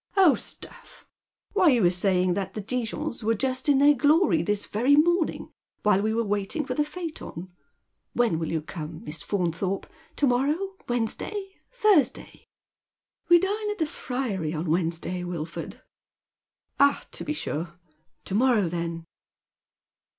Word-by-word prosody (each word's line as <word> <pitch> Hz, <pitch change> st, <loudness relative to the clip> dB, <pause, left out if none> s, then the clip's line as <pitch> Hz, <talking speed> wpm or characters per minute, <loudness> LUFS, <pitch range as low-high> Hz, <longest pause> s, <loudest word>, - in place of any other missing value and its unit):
" -, -, -26 dB
Oil, 365 Hz, -7 st, +7 dB
stuff -, -, -8 dB, 0.5 s
1 390 Hz, -4 st, +4 dB
why, -, -, +7 dB
you 230 Hz, -, +2 dB
were 175 Hz, -, +5 dB
saying 180 Hz, 0 st, +2 dB
that 195 Hz, 0 st, -3 dB
the -, -, -3 dB
Dijons 240 Hz, +4 st, -3 dB
were 225 Hz, +1 st, +2 dB
just 260 Hz, +4 st, -1 dB
in 280 Hz, -, +5 dB
their 285 Hz, +2 st, +6 dB
glory 285 Hz, -, +3 dB
this 205 Hz, +4 st, -1 dB
very 250 Hz, +7 st, +3 dB
morning, 340 Hz, +3 st, +2 dB, 0.3 s
while 205 Hz, -2 st, +4 dB
we 215 Hz, +1 st, 0 dB
were 230 Hz, +1 st, +1 dB
waiting 205 Hz, +8 st, -2 dB
for -, -, -2 dB
the 300 Hz, -, +1 dB
priacton. 300 Hz, -, -6 dB, 0.7 s
AV 240 Hz, -, +5 dB
hen 165 Hz, -8 st, 0 dB
will 160 Hz, -, -3 dB
you 160 Hz, -2 st, -1 dB
come, 155 Hz, -1 st, -7 dB
Miss 150 Hz, +1 st, -4 dB
Fauntliorpe? 185 Hz, 0 st, -1 dB, 0.3 s
To 290 Hz, -, +2 dB
morrow 270 Hz, +4 st, +2 dB, 0.3 s
•—Wednesday 385 Hz, -, -2 dB
— -, -, -46 dB
Thursdny? 310 Hz, -, +2 dB, 0.3 s
" -, -, -68 dB
*' -, -, -49 dB
We 345 Hz, -, +9 dB
dine 415 Hz, +4 st, -1 dB
at 420 Hz, -, -3 dB
the 320 Hz, -, +1 dB
Friary 225 Hz, -, -3 dB
on 155 Hz, +1 st, -2 dB
Wednesday, 170 Hz, +1 st, -1 dB
Wilford." 170 Hz, -2 st, -6 dB, 0.5 s
" -, -, -48 dB
Ah, 280 Hz, 0 st, +4 dB
to -, -, -5 dB
be 300 Hz, -, -2 dB
sure. 170 Hz, -, -4 dB, 0.5 s
To -, -, -5 dB
morrow, 225 Hz, -3 st, +3 dB
then 170 Hz, -1 st, -4 dB
220 Hz, 165 wpm, -26 LUFS, 180-295 Hz, 0.7 s, We